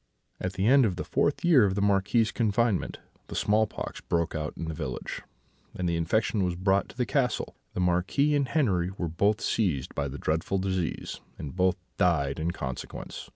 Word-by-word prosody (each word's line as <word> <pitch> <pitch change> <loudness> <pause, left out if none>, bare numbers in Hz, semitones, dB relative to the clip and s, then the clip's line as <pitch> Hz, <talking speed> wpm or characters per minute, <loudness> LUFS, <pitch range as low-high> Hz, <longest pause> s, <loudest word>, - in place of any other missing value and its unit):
"At 95 0 -3
the 95 +1 -1
end 135 +3 +6
of 100 -6 +1
the - - -3
fourth 145 +5 0
year 155 -9 +7
of 95 -2 +2
the - - 0
Marquis's 100 +3 +3
confinement 110 -2 +1 0.3
the - - -7
small 105 +1 +3
pox - - -6
broke 85 -1 0
out 75 -1 -4
in - - -4
the 80 - -3
village, 65 -4 -5 0.5
and 90 - -1
the 85 - +1
infection 100 +5 +1
was 90 -1 0
brought 95 +2 +1
to - - -14
the 125 - +1
castle. 125 +2 0 0.2
The 90 - 0
Marquis 90 +12 +2
and 140 -2 +2
Henri 100 - +1
were 85 - -1
both 100 +7 +1
seized 85 - 0
by 70 -1 -1
the 70 +1 -6
dreadful 80 +6 0
disease, 95 -3 -2 0.2
and 75 - -7
both 90 0 +3 0.2
died 80 -5 +2
in 80 +2 0
consequence. 65 -7 -6
95 Hz, 195 wpm, -28 LUFS, 85-110 Hz, 0.5 s, year